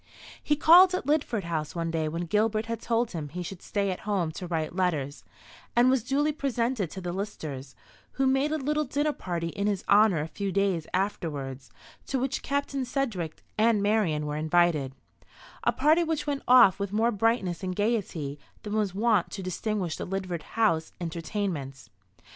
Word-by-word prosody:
He 295 - +2
called 355 +5 +7
at 365 - -3
Lidford 280 -8 0
House 160 -2 -3
one 165 -1 -2
day 160 -1 -1
when 165 +3 -3
Gilbert 215 +4 +1
had 230 0 -4
told 235 0 0
him 155 -4 -5
he 180 +4 -5
should 180 +1 -8
stay 200 -2 -1
at 180 - -4
home 195 -6 -1
to 180 +3 -7
write 165 -1 -2
letters, 155 -7 -1 0.5
and 245 +2 +5
was 260 -4 +1
duly 285 +4 +1
presented 245 - -1
to 190 - -7
the 175 -1 -4
Listers, 145 -9 -6 0.4
who 270 - 0
made 270 +3 +2
a 315 - +1
little 300 +2 0
dinner 290 +2 0
party 170 -6 -3
in 200 +4 -2
his 200 -3 -1
honour 205 -4 +5
a 150 - -2
few 195 +4 -4
days 190 -5 0
afterwards, 150 -9 -3 0.4
to 270 - -1
which 260 +1 -1
Captain 280 -1 -1
Sedgewick 235 - -3 0.2
and 220 -2 +3
Marian 200 -8 +1
were 150 0 -3
invited 155 -4 +2 0.7
a - - +3
party 315 +3 +3
which 320 -2 -2
went 285 -2 -2
off 225 -7 +7
with 200 -1 -3
more 225 +3 +2
brightness 205 -5 0
and 185 -1 -3
gaiety 180 -10 -1 0.2
than 210 - -5
was 210 -4 0
wont 215 -3 +2
to 195 - -6
distinguish 185 -1 -2
the - - -5
Lidford 185 -3 -3 0.2
House 165 -8 +2
entertainments. 165 -5 -4
200 Hz, 180 wpm, -27 LUFS, 165-240 Hz, 0.7 s, called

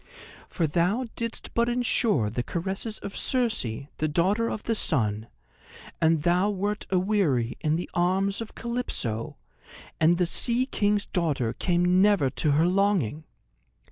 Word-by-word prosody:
For 170 - -1
thou 175 - 0
didst 230 -1 -4
but 235 +1 +2
endure 230 - +1
the 120 - -2
caresses 190 - -4
of 200 - -6
Circe, 245 -4 +2 0.4
the 155 - 0
Daughter 190 +9 +1
of 210 - -5
the 230 - 0
Sun, 110 - +1 0.7
and 160 -2 +3
thou 180 +4 +2
wert 205 +1 -3
aweary 180 - +1
in 155 0 +1
the 175 - -3
arms 190 +4 0
of 225 - -8
Calypso, 235 - -3 0.6
and 165 +2 +4
the 180 - +2
Sea 240 +8 +2
King's 205 -5 0
daughter 145 - -1
came 180 +1 +2
never 195 -10 +3
to 150 -3 0
her 155 +3 +3
longing. 180 - +1
180 Hz, 140 wpm, -26 LUFS, 155-210 Hz, 0.7 s, and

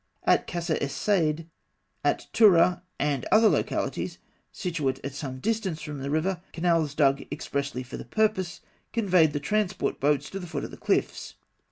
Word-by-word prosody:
At - - +3
Kasr 170 -2 -1
es 140 -1 -2
Saîd, 165 -6 +1 0.6
at - - +1
Tûrah, 180 -4 +5 0.2
and 145 -3 0
other 220 +1 +7
localities - - -1 0.3
situate 150 -8 -2
at 140 - -4
some 135 -2 -5
distance 205 - -1
from 150 -2 -6
the 135 +1 -4
river, 170 +4 0
canals 165 -4 +1
dug 140 -2 +3
expressly 140 -2 -3
for 125 - -8
the - - -8
purpose 215 -5 0 0.3
conveyed 185 -8 +4
the 145 - -2
transport 200 +4 -1
boats 145 0 +1
to 195 - -4
the 180 - -7
foot - - -4
of - - -6
the - - -10
cliffs. - - -1
165 Hz, 165 wpm, -27 LUFS, 140-190 Hz, 0.6 s, other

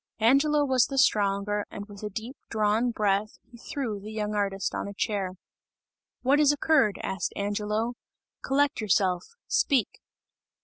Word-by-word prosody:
Angelo 285 +6 +4
was 260 -3 +3
the 275 - -5
stronger, 205 -3 +2
and 205 - -7
with 205 -2 -12
a 210 - -4
deep 225 +6 -6
drawn 220 +2 +1
breath, 210 -2 0
he 235 - -14
threw 235 -6 -4
the 210 +2 -9
young 215 -1 -2
artist 200 -2 -1
on - - -3
a 200 - -8
chair. 195 -3 -1 0.9
"What 275 +3 +4
has 295 -1 +6
occurred?" 290 -7 +2
asked 190 -2 -2
Angelo, 210 +3 -1 0.5
"Collect 280 -2 +1
yourself! 185 -3 +1 0.2
Speak!" 280 - +1
215 Hz, 145 wpm, -27 LUFS, 205-260 Hz, 0.9 s, has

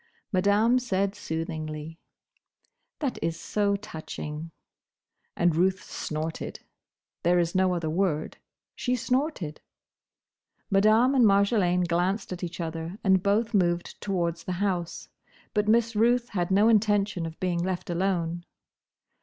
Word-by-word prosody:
Madame 205 +6 +4
said 200 -5 0
soothingly, 160 -3 -5 1.0
"That 275 -5 -2
is 165 0 -2
so 205 -1 0
touching!" 160 -4 -6 0.9
And 175 -2 +3
Ruth 185 +2 +2
snorted. 155 +1 -5 0.6
There 175 +1 +3
is 170 -1 +1
no 185 -1 +2
other 170 -2 -2
word. 160 -2 -1 0.4
She 250 0 0
snorted. 250 - -1 1.1
Madame 215 +6 +5
and 260 -3 +4
Marjolaine 200 -3 +3
glanced 185 +4 0
at 180 - -7
each 175 0 -5
other, 165 +2 -4
and 190 -2 +4
both 215 +4 +1
moved 175 -3 0
towards 170 -4 -2
the 185 - -2
house. 180 -2 -2 0.5
But 210 -1 +1
Miss 230 +1 +3
Ruth 240 +3 +3
had 175 -4 -1
no 200 +3 +4
intention 205 -5 +2
of 160 - -10
being 180 -2 0
left 180 0 -2
alone. 175 -1 -1
185 Hz, 125 wpm, -27 LUFS, 170-210 Hz, 1.1 s, Madame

